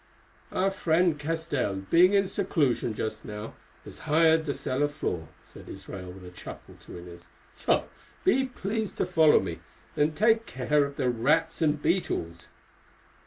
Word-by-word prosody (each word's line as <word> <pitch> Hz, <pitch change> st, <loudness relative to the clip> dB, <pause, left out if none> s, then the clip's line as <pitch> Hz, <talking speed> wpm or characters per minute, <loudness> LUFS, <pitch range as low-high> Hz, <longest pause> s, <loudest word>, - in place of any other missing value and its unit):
"Our 195 Hz, +1 st, +1 dB
friend 170 Hz, -3 st, +2 dB
Castell, 150 Hz, -9 st, -2 dB, 0.2 s
being 180 Hz, +3 st, +6 dB
in 200 Hz, -1 st, +4 dB
seclusion 150 Hz, -, 0 dB
just 110 Hz, 0 st, -4 dB
now, 105 Hz, +1 st, -7 dB, 0.3 s
has -, -, -10 dB
hired 160 Hz, +1 st, +4 dB
the 140 Hz, -, -1 dB
cellar 140 Hz, +3 st, 0 dB
floor," 90 Hz, -, -4 dB, 0.2 s
said -, -, -13 dB
Israel 90 Hz, -2 st, -8 dB
with 90 Hz, 0 st, -12 dB
a 90 Hz, -, -10 dB
chuckle -, -, -10 dB
to -, -, -9 dB
Inez, 85 Hz, 0 st, -11 dB, 0.3 s
"so -, -, +1 dB, 0.4 s
be 265 Hz, +1 st, +3 dB
pleased 220 Hz, -3 st, -4 dB
to -, -, +1 dB
follow 160 Hz, -4 st, +5 dB
me, 85 Hz, -3 st, -5 dB, 0.4 s
and 150 Hz, +1 st, +1 dB
take 225 Hz, +3 st, +3 dB
care 140 Hz, +3 st, +1 dB
of 140 Hz, 0 st, -7 dB
the 125 Hz, -2 st, +1 dB
rats 155 Hz, +9 st, +1 dB
and 150 Hz, -2 st, +2 dB
beetles." 150 Hz, -, -1 dB
150 Hz, 155 wpm, -27 LUFS, 115-175 Hz, 0.4 s, being